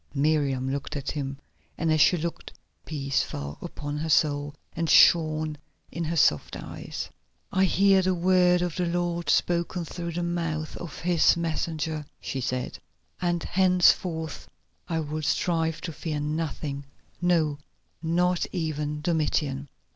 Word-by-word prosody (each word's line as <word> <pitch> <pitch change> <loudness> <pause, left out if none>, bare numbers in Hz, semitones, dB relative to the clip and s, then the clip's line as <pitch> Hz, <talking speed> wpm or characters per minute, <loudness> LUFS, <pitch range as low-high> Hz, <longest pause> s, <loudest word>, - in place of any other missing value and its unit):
Miriam 140 -3 +1
looked 140 +3 -4
at 140 -2 -3
him, 135 -2 -4 0.4
and 165 -1 +2
as 155 - +3
she 180 - +5
looked 170 +1 -4 0.4
peace 140 -2 0
fell 70 0 -5
upon 145 -4 -5
her 160 +2 -3
soul 145 -1 +2 0.2
and 165 0 -2
shone 155 -2 +5 0.3
in 170 - -3
her 165 +2 -2
soft 110 - +2
eyes. - - -6 0.4
"I 190 0 +3
hear 195 +1 +4
the 185 0 +1
word 180 0 +4
of 175 -3 -2
the 180 -1 0
Lord 175 0 -1
spoken 170 0 +1
through 170 +1 -5
the 175 +1 -2
mouth 165 -3 -2
of 175 -4 -8
His 170 -1 +4
messenger," 160 -2 -2 0.2
she 135 - -4
said, 125 +1 -3 0.4
"and 175 -2 0
henceforth 180 -3 +2 0.4
I 165 -1 0
will 155 +1 -4
strive 165 +1 0
to 165 - -5
fear 150 -1 -3
nothing, 150 -2 -3 0.4
no, 160 -5 +2 0.4
not 175 +2 +1
even 150 -3 -2
Domitian." 150 -4 0
160 Hz, 140 wpm, -27 LUFS, 150-175 Hz, 0.4 s, she